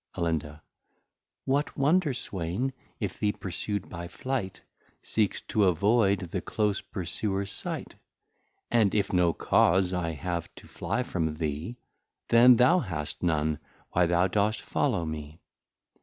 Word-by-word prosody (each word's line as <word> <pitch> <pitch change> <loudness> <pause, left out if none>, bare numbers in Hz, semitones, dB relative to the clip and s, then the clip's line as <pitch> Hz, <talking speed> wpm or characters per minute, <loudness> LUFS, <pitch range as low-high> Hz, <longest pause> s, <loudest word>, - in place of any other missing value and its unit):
Alinda. 80 -2 -2 0.8
What 140 +3 0
wonder, 150 0 +3
Swain, 100 +6 -3 0.3
if 105 -5 -4
the 105 -1 +1
Pursu'd 100 +2 -4
by 85 -1 -6
Flight, 100 -2 -4 0.4
Seeks 105 -3 0
to 105 -2 +1
avoid 100 +3 +3
the 90 -3 -4
close 105 -2 0
Pursuers 95 +2 -3
Sight? - - -5 0.8
And 110 -4 +3
if 100 -1 +1
no 90 -2 +4
Cause 90 +3 +3
I 85 -2 -1
have 85 +2 -3
to - - -13
fly 125 - -2
from 80 -8 -2
thee, 80 +8 -3 0.5
Then 120 +2 +8
thou 130 +10 +5
hast 80 - -4
none, 80 -3 +1 0.3
why 90 -1 +3
thou 85 +1 +3
dost 105 +3 +1
follow 85 - 0
me. 75 0 -6
95 Hz, 130 wpm, -28 LUFS, 85-110 Hz, 0.8 s, Then